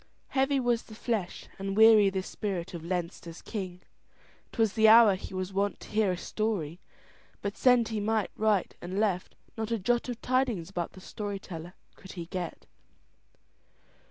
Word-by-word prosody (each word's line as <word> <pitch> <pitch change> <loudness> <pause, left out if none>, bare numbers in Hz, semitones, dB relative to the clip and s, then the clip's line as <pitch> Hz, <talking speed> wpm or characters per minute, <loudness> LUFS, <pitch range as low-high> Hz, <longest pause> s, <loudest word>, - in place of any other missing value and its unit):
Heavy 270 +1 +2
was 240 -2 +1
the 215 - -13
flesh 215 -5 -3
and 195 +1 -3
weary 220 -2 +8
the 190 -1 -2
spirit 190 -3 -4
of 170 -2 -6
Leinster's 170 -1 -4
king. 185 -4 -5 0.7
'Twas 225 -4 +1
the 220 -1 +5
hour 220 -2 +8
he 185 - -6
was 185 +1 -3
wont 200 +1 0
to - - -12
hear 210 -2 +2
a 180 - -2
story, 185 -6 -2 0.6
but 200 0 -2
send 245 -3 +4
he 220 -2 -2
might 215 0 0
right 215 -3 +1
and 185 +3 -3
left, 195 -4 0 0.2
not 220 0 -2
a 230 - +1
jot 240 +5 0
of 240 -1 -4
tidings 245 -9 0
about 175 -3 -3
the 185 - -12
story 205 +1 -5
teller 175 -2 -9 0.2
could 190 - -12
he 170 -2 -6
get. 175 -1 -5
200 Hz, 170 wpm, -29 LUFS, 185-225 Hz, 0.7 s, weary